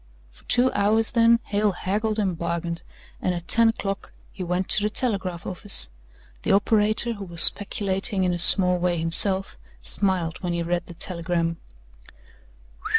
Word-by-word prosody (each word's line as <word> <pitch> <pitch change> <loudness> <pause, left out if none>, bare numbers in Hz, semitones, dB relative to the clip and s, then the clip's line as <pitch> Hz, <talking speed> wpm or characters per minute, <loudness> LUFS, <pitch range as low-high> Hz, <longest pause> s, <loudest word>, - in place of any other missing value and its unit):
For - - -22
two 250 +1 +2
hours 215 +2 +1
then, 230 -1 +3
Hale 205 0 -2
haggled 210 +4 -3
and 195 -5 -2
bargained, 170 0 -5 0.4
and 180 - -2
at 170 0 -9
ten 230 0 +2
o'clock 195 -3 -6 0.2
he 185 - -8
went 180 +1 -3
to - - +1
the 210 - -1
telegraph 195 -7 -4
office. 190 - +2 0.5
The - - -1
operator 215 +3 +1
who 200 -2 -9
was 170 -2 +2
speculating 195 0 +1
in 180 -1 -1
a 175 - -4
small 180 0 +6
way 175 0 -2
himself 190 - +2 0.2
smiled 175 - +1
when 175 -2 -4
he 170 0 -3
read 175 +1 -4
the 175 - -12
telegram. 170 -2 -4
190 Hz, 155 wpm, -22 LUFS, 175-210 Hz, 0.5 s, small